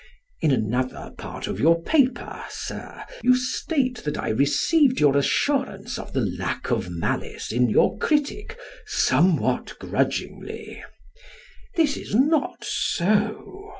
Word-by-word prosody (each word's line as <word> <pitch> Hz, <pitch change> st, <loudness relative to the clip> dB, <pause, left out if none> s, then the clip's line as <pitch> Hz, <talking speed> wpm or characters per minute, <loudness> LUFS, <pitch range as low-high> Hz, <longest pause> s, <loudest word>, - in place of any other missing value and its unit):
In 155 Hz, -, +3 dB
another 125 Hz, 0 st, -1 dB
part -, -, -7 dB
of 95 Hz, -, -4 dB
your 165 Hz, +6 st, +4 dB
paper, 260 Hz, -, +1 dB
Sir, -, -, -7 dB, 0.2 s
you 255 Hz, -, +6 dB
state 255 Hz, 0 st, -1 dB
that 150 Hz, -, -2 dB
I -, -, -2 dB
received 255 Hz, -, +3 dB
your 145 Hz, -2 st, +4 dB
assurance 210 Hz, -, 0 dB
of -, -, -9 dB
the 135 Hz, -, +1 dB, 0.2 s
lack 95 Hz, -, -3 dB
of 90 Hz, -, 0 dB
malice 85 Hz, -1 st, -3 dB
in 120 Hz, +1 st, +2 dB
your -, -, +3 dB
critic 315 Hz, +10 st, -1 dB, 0.3 s
"somewhat 175 Hz, -2 st, +2 dB
grudgingly." -, -, -3 dB, 0.9 s
This 315 Hz, -5 st, +2 dB
is -, -, -5 dB
not 290 Hz, +5 st, +2 dB
so. 215 Hz, -, -1 dB
215 Hz, 120 wpm, -24 LUFS, -, 0.9 s, you